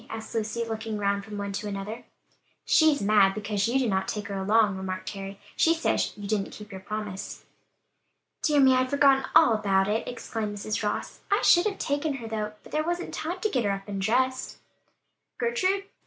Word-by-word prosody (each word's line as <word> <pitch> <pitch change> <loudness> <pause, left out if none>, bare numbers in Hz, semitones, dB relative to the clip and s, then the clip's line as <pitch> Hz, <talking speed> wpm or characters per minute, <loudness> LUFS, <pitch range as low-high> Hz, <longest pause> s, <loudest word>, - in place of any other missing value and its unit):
asked 225 0 -7
Lucy, 225 +1 -1
looking 220 -1 -4
round 200 0 0
from 210 0 -8
one 200 0 -3
to 210 +2 -4
another. 205 +3 -5 0.6
"She's 315 -7 +4
mad 200 -2 +4
because 205 -1 -1
you 245 +3 +1
did 250 -5 +1
not 190 0 0
take 210 -1 -4
her 200 - -3
along," 205 +1 +3
remarked 185 0 -4
Harry, 195 0 -7 0.2
"she 330 +1 +4
says 325 - 0
you 205 -1 -6
didn't 205 -2 -1
keep 210 0 -11
your 190 -1 -8
promise." 210 -1 -6 1.0
"Dear 295 -3 +3
me, 265 -1 +6
I'd 255 0 +2
forgotten 275 -1 +4
all 315 -7 +7
about 195 -3 +2
it!" 215 +2 -1
exclaimed 225 -3 -4
Mrs. 215 +1 -3
Ross. 210 -1 -3
"I 405 - +2
should 350 +4 +6
have 400 -2 -3
taken 285 +1 -1
her 235 -4 -7
though, 215 -1 -3
but - - -15
there 310 - 0
wasn't 345 +2 -3
time 350 +4 -4
to 430 - +1
get 255 - 0
her 205 - +1
up 195 0 -3
and 200 -1 -4
dressed." 255 +5 0 0.8
"Gertrude! 400 -5 0
215 Hz, 200 wpm, -27 LUFS, 200-270 Hz, 1.0 s, all